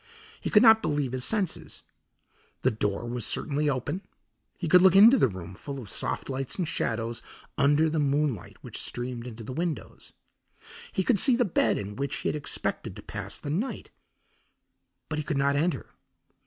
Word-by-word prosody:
He - - -3
could 210 - +6
not 220 -1 +7
believe 145 -4 -1
his 130 -1 -2
senses. 205 -1 -2 0.8
The 130 - +4
door 105 0 -2
was 120 -1 -3
certainly 150 +6 0
open; 140 +7 -2 0.6
he 175 - -3
could 180 +3 +7
look 190 0 +6
into 225 +7 +8
the - - +5
room 95 -4 -8
full 140 +8 -7
of 110 -6 -9
soft - - -3
lights 135 -1 -3
and 180 -4 -2
shadows 115 -6 -2 0.3
under 145 +3 +4
the 160 0 0
moonlight 140 -6 0
which - - -5
streamed 120 0 -3
into 115 -1 -8
the 130 - -6
windows. 160 - -4 0.8
He 190 - 0
could 210 0 +3
see 255 +4 +5
the 245 0 +2
bed 140 - +2
in 105 0 -5
which 140 0 -2
he - - -2
had - - -2
expected 150 - -2
to - - -10
pass - - -5
the 145 - -5
night, 210 - -3 1.2
but 150 - -3
he - - -2
could 150 -1 -2
not 140 +1 +2
enter. 165 +4 -1
145 Hz, 180 wpm, -27 LUFS, 120-175 Hz, 1.2 s, into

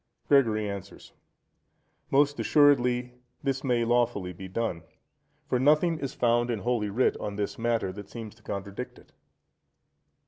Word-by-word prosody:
Gregory 110 -7 +3
answers.—Most 115 +7 -4
assuredly 125 0 +3 0.3
this 135 -1 -1
may 120 -3 +1
lawfully 115 -6 +1
be 95 +2 -9
done; 95 -3 -2 0.7
for 125 - +1
nothing 155 +4 +3
is 135 -4 -4
found 120 0 +2
in 115 -4 -2
Holy 115 -3 0
Writ 120 +6 +2
on 105 - -5
this 105 +2 -3
matter 115 -4 0
that 100 0 -9
seems 115 -3 -8
to 110 - -24
contradict 100 +3 -6
it. - - -19
120 Hz, 135 wpm, -28 LUFS, 105-125 Hz, 0.7 s, Gregory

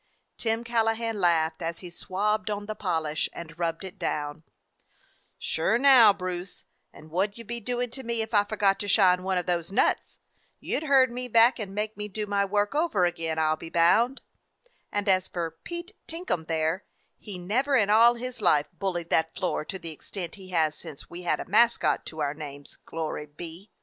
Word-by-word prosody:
Tim 225 0 -1
Callahan 225 -1 0
laughed, 160 -2 +2
as 165 0 -4
he 180 -2 -9
swabbed 210 +5 -1
on 205 0 -3
the 215 - -4
polish 160 -7 -1
and 165 -1 -9
rubbed 165 +1 -2
it 190 -2 -9
down: 145 +1 -3 1.0
"Sure - - 0
now, 255 -5 +8
Bruce, 180 -1 -5 0.3
and 155 +1 -15
what 195 +4 0
'd - - -16
you 230 - -8
be 235 +2 -3
doing 245 +1 -2
to 265 - -6
me 235 -2 -1
if 220 - -9
I 205 -1 +5
forgot 205 -2 +1
to 205 - -3
shine 185 -3 +4
one 190 0 -1
of 180 - -1
those 175 -1 -1
nuts? 215 - +1 0.4
You - - -2
'd 315 - -7
herd 265 -4 +5
me 250 +1 -4
back 235 +2 +5
and 195 -2 -5
make 210 +1 -2
me 210 0 -4
do 210 +1 -4
my 200 -1 +1
work 205 +2 0
over 290 - +2
again, 165 -2 -2
I 155 -1 +2
'll 155 - 0
be 165 - -9
bound. 220 +11 +3 0.7
And 205 0 -1
as 185 -1 +3
for 170 -2 -3
Pete 345 +3 -6 0.2
Tinkum 330 - -3
there, 160 +3 0 0.4
he 205 -3 -6
never 245 +11 0
in 205 -5 +3
all 230 +3 +6
his 245 -1 -6
life 150 -6 +3
bullied 175 -1 -3
that 160 0 +2
floor 185 -4 -1
to 190 - -5
the 165 -3 -7
extent 170 +3 -7
he 190 -2 -11
has 160 -4 +2
since 140 - -10
we 175 +1 -7
had 175 - 0
a - - -5
mascot 235 +5 +2
to 155 -1 -6
our 145 -1 0
names, 145 -2 -9
glory 155 -2 -4
be! 165 +6 -10
195 Hz, 200 wpm, -27 LUFS, 165-225 Hz, 1.0 s, now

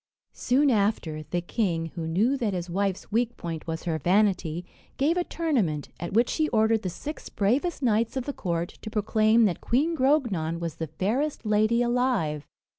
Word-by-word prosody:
Soon 270 +3 +2
after, 200 -8 0
the 160 +4 -3
king, 170 -4 -1
who 165 -2 -4
knew 210 +12 +2
that 225 -7 -1
his 175 -1 -4
wife's 195 +1 -2
weak 235 +2 0
point 165 -2 -6
was 160 0 -4
her 160 -2 -1
vanity, 180 -1 +1 0.3
gave 300 +5 +2
a 355 - +1
tournament, 235 - -1
at 170 - -4
which 235 +3 +2
he 310 -1 +2
ordered 220 -1 +3
the 185 - -3
six 295 - -7
bravest 265 - 0
knights 230 +1 +1
of 255 - -2
the 285 - -3
court 170 -5 -3
to 215 - -6
proclaim 220 +1 +3
that 185 -5 -1
Queen 300 +8 +1
Grognon 240 - +1
was 170 -2 -5
the 160 - -3
fairest 225 - -2
lady 215 +3 +3
alive. 240 - 0
215 Hz, 180 wpm, -26 LUFS, 170-245 Hz, 0.3 s, ordered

